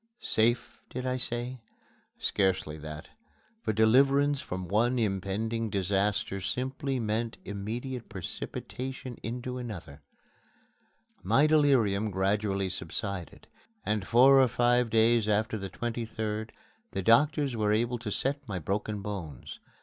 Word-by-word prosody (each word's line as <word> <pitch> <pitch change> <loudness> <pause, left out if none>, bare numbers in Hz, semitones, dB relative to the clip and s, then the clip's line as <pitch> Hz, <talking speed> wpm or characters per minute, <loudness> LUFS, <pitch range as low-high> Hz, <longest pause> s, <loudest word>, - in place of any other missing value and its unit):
"Safe," 120 - +1
did 125 +1 -5
I 130 0 0
say? 120 +1 -1 0.6
Scarcely 95 -6 0
that 75 0 -8 0.5
for - - 0
deliverance 135 +6 +4
from 90 0 -5
one 115 +7 +2
impending 110 +2 -1
disaster 100 0 0
simply 130 +6 -2
meant 115 +1 -1
immediate 115 +5 -5
precipitation 125 +6 -6
into 125 +2 -4
another. 90 - -7 1.2
My 145 - +4
delirium 130 -10 +3
gradually 100 0 0
subsided, 90 +1 -5 0.4
and 105 -3 -1
four 135 +3 +7
or 130 - +5
five 120 0 +2
days 110 0 +3
after 110 +1 +1
the 95 -2 -4
23d 110 -1 -3 0.4
the 95 - -2
doctors 140 - +4
were 105 -2 +1
able 120 +3 +1
to 115 -2 -4
set 135 +7 -1
my 100 -4 -3
broken 100 +4 -2
bones. 90 - -6
110 Hz, 120 wpm, -29 LUFS, 100-125 Hz, 1.2 s, four